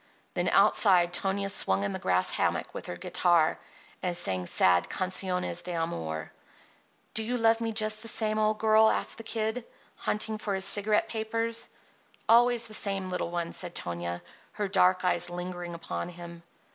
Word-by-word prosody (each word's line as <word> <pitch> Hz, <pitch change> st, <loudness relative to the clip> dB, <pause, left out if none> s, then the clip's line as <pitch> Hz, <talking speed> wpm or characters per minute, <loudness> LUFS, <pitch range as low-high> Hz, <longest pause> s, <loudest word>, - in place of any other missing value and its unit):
Then -, -, 0 dB
outside 175 Hz, -4 st, +4 dB
Tonia 195 Hz, +2 st, 0 dB
swung 100 Hz, -, +2 dB
in 100 Hz, -, -2 dB
a -, -, -5 dB
grass 90 Hz, 0 st, +2 dB
hammock -, -, -1 dB
with -, -, -7 dB
her -, -, -5 dB
guitar 170 Hz, -, +2 dB, 0.4 s
and 180 Hz, -2 st, -1 dB
sang 95 Hz, -, -2 dB
sad 90 Hz, 0 st, +3 dB
canciones 180 Hz, -2 st, -1 dB
de 180 Hz, 0 st, -4 dB
amor. 80 Hz, -, -4 dB, 0.8 s
"Do 220 Hz, -, 0 dB
you 240 Hz, +3 st, -2 dB
love 225 Hz, 0 st, +3 dB
me 225 Hz, -1 st, -1 dB
just 215 Hz, 0 st, +1 dB
the 230 Hz, -, -7 dB
same, 215 Hz, -1 st, +1 dB
old 215 Hz, 0 st, +1 dB
girl?" 220 Hz, 0 st, +5 dB
asked -, -, -2 dB
the -, -, -7 dB
Kid, 225 Hz, +1 st, -2 dB, 0.3 s
hunting 215 Hz, 0 st, -1 dB
for 205 Hz, -2 st, -2 dB
his 190 Hz, 0 st, +2 dB
cigarette 210 Hz, +1 st, +2 dB
papers. 230 Hz, +1 st, -3 dB, 0.6 s
"Always 240 Hz, 0 st, +4 dB
the 215 Hz, -, -12 dB
same, 195 Hz, -3 st, -2 dB
little 180 Hz, -2 st, -3 dB
one," 170 Hz, -1 st, -3 dB
said 175 Hz, -2 st, -2 dB
Tonia, 85 Hz, 0 st, -4 dB, 0.3 s
her 205 Hz, -1 st, -2 dB
dark 185 Hz, -1 st, +3 dB
eyes 175 Hz, -1 st, +2 dB
lingering 175 Hz, -1 st, -6 dB
upon 85 Hz, -, -5 dB
him. 170 Hz, -1 st, -10 dB
185 Hz, 170 wpm, -28 LUFS, 170-215 Hz, 0.8 s, girl